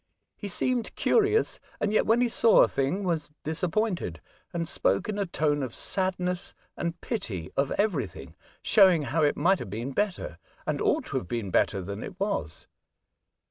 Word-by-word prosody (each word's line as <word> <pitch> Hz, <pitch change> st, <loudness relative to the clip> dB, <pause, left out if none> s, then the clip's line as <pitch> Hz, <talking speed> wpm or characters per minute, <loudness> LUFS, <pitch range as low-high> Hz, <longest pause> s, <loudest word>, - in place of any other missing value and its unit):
He 205 Hz, -, -6 dB
seemed 245 Hz, +5 st, 0 dB
curious, 430 Hz, 0 st, +2 dB, 0.2 s
and 210 Hz, -, 0 dB
yet -, -, +3 dB
when 230 Hz, +2 st, +4 dB
he 245 Hz, -, +4 dB
saw 230 Hz, -1 st, +5 dB
a -, -, +4 dB
thing 140 Hz, +9 st, -1 dB
was 165 Hz, -5 st, -1 dB
disappointed, 170 Hz, -, -1 dB, 0.3 s
and 170 Hz, -1 st, -2 dB
spoke -, -, +1 dB
in 210 Hz, -1 st, -2 dB
a 200 Hz, -, 0 dB
tone 150 Hz, -3 st, 0 dB
of 130 Hz, -4 st, -4 dB
sadness 180 Hz, -1 st, -2 dB, 0.2 s
and 170 Hz, 0 st, -3 dB
pity 100 Hz, -, -4 dB
of 140 Hz, 0 st, +1 dB
everything, 170 Hz, -, -2 dB, 0.3 s
showing 185 Hz, -7 st, +5 dB
how 155 Hz, +4 st, 0 dB
it 145 Hz, -1 st, +2 dB
might 185 Hz, +6 st, +3 dB
have -, -, -6 dB
been 115 Hz, +7 st, -4 dB
better, 180 Hz, -, -2 dB, 0.3 s
and -, -, -1 dB
.ought -, -, +2 dB
to -, -, -3 dB
have 90 Hz, -, -4 dB
been 105 Hz, -2 st, -3 dB
better 95 Hz, +1 st, +2 dB
than 100 Hz, +3 st, -5 dB
it 180 Hz, -, -8 dB
was. 190 Hz, -, -2 dB
175 Hz, 175 wpm, -27 LUFS, 135-205 Hz, 0.3 s, saw